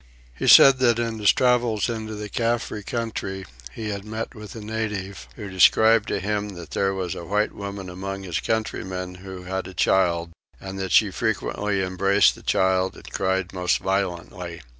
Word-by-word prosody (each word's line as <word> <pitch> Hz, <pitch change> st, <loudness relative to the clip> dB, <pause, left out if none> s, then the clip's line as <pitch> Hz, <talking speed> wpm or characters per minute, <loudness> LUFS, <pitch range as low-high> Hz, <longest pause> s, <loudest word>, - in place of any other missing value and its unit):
He 65 Hz, -, -4 dB
said 135 Hz, -1 st, +9 dB
that 120 Hz, -3 st, +3 dB
in 115 Hz, -1 st, -2 dB
his 105 Hz, -, +5 dB
travels 120 Hz, -4 st, +2 dB
into 110 Hz, -2 st, -4 dB
the 105 Hz, 0 st, -5 dB
Caffre 115 Hz, -1 st, -1 dB
country 105 Hz, -4 st, -4 dB, 0.3 s
he 110 Hz, -, -5 dB
had 100 Hz, -1 st, -4 dB
met 110 Hz, +2 st, -5 dB
with 105 Hz, -1 st, -10 dB
a -, -, -6 dB
native 105 Hz, -3 st, -4 dB
who 105 Hz, -4 st, -7 dB
described 105 Hz, +3 st, +5 dB
to -, -, -1 dB
him 105 Hz, 0 st, -2 dB
that 85 Hz, -3 st, -10 dB
there 95 Hz, 0 st, +1 dB
was 90 Hz, -3 st, -3 dB
a -, -, -7 dB
white 105 Hz, +5 st, 0 dB
woman 100 Hz, -1 st, -6 dB
among 95 Hz, +2 st, -6 dB
his 85 Hz, -4 st, -2 dB
countrymen 95 Hz, -4 st, -3 dB
who 95 Hz, -1 st, -8 dB
had 95 Hz, +1 st, -4 dB
a 95 Hz, -, -11 dB
child, 85 Hz, -2 st, +2 dB, 0.3 s
and 95 Hz, 0 st, -7 dB
that 95 Hz, -2 st, -3 dB
she 105 Hz, -3 st, +5 dB
frequently 105 Hz, -2 st, -1 dB
embraced 95 Hz, +2 st, +3 dB
the -, -, -14 dB
child 95 Hz, 0 st, +1 dB
and -, -, -13 dB
cried 95 Hz, -1 st, -1 dB
most 90 Hz, -1 st, +1 dB
violently. 90 Hz, -3 st, -3 dB
100 Hz, 180 wpm, -24 LUFS, 95-110 Hz, 0.3 s, said